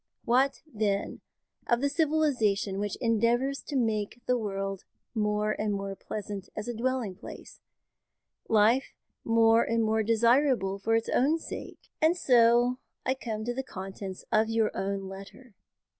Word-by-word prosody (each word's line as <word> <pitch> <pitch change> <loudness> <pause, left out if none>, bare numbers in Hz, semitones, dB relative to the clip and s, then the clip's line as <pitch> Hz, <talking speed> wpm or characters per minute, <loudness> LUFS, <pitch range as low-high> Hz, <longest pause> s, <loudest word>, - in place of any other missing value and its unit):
What 260 +3 +2
then 210 -8 -2 0.5
of 240 - +3
the 285 - +1
civilisation 280 - +1
which 205 -1 -2
endeavours 240 +4 +1
to 290 - -4
make 220 -2 0
the 250 - +2
world 195 -4 -3 0.3
more 210 -1 0
and 215 0 -1
more 195 -1 -3
pleasant 200 -1 -6
as 210 - -5
a 240 - -2
dwelling 240 -3 -1
place, 185 - -11 0.9
life 225 +4 +3 0.3
more 230 0 +4
and 230 0 +1
more 220 0 +2
desirable 230 -2 +2
for 225 +3 +1
its 225 - 0
own 290 +6 +3
sake? 325 - -9
"And 320 +3 +4
so 245 -2 +4 0.3
I 260 - +2
come 220 -5 -5
to 240 - -1
the 265 - -2
contents 190 -4 -8
of 220 +1 +3
your 225 -1 +1
own 195 0 -2
letter. 195 +5 -11
225 Hz, 145 wpm, -28 LUFS, 205-250 Hz, 0.9 s, more